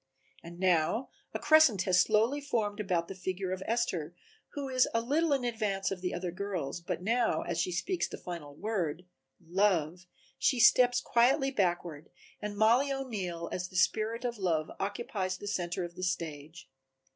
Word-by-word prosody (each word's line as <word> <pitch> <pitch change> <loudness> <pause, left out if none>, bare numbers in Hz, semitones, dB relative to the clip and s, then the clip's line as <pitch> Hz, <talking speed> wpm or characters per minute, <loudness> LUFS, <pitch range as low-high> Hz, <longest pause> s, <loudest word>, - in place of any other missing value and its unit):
And 170 +1 -11
now 185 +6 +2 0.2
a - - -3
crescent 310 - +5
has 180 -1 +3
slowly 225 +7 +2
formed 215 -7 -1
about 180 -5 0
the - - -6
figure 185 0 -4
of 185 0 -3
Esther 185 -9 -1 0.4
who 285 -1 -4
is 255 -1 +3
a - - +4
little 300 +7 +1
in 275 -3 +2
advance 215 -5 -1
of 190 -2 -4
the 180 - -2
other 175 0 -3
girls, 180 -6 -4
but 175 +1 -4
now 235 +3 +1
as - - -1
she 180 - -1
speaks 345 - -1
the - - -8
final 160 -5 -8
word 180 -4 -2 0.3
Love 180 -1 0 0.3
she 255 - +2
steps 245 +1 +6
quietly 270 +4 +3
backward 175 - -1 0.3
and 210 -1 -5
Mollie 235 +6 +4
O'Neill 195 -11 -4
as 180 0 -3
the - - -15
spirit 220 +5 +1
of 240 -3 -3
Love 160 -5 0
occupies 195 -2 -2
the 205 - -9
center 175 -1 -2
of 175 0 -6
the 180 - -9
stage. 160 -3 -4
195 Hz, 170 wpm, -31 LUFS, 175-235 Hz, 0.4 s, steps